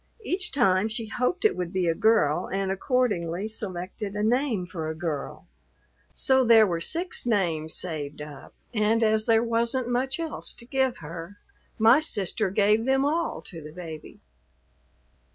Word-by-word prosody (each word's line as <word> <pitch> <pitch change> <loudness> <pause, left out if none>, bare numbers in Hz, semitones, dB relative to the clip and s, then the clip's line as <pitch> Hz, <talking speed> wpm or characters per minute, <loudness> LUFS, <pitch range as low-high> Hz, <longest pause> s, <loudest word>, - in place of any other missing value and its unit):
Each 370 -2 -2
time 190 -5 +3
she 225 +1 -4
hoped 360 - -1
it 435 - +4
would 180 -2 -3
be 185 -2 0
a 165 - +3
girl, 210 -7 +2
and 195 0 -1
accordingly 195 - 0
selected 200 -1 -5
a 210 - -1
name 235 -4 +1
for 165 -3 -5
a 160 - -4
girl. 160 -4 -4 0.7
So 265 -1 +2
there 230 -2 +7
were 170 -4 -2
six 345 - -1
names 165 -8 0
saved 150 -5 -3
up, 150 -2 -10 0.2
and 220 +1 +2
as 215 0 +2
there 225 0 +4
wasn't 235 +2 0
much 260 +4 0
else 325 -2 +1
to 235 - -7
give 265 0 0
her, 165 +5 -8 0.4
my 230 +4 +6
sister 210 - -1
gave 210 +3 +2
them 270 +1 +2
all 330 +3 -1
to 165 -3 -8
the 150 0 -10
baby." 160 -2 -9
215 Hz, 160 wpm, -26 LUFS, 175-245 Hz, 0.7 s, there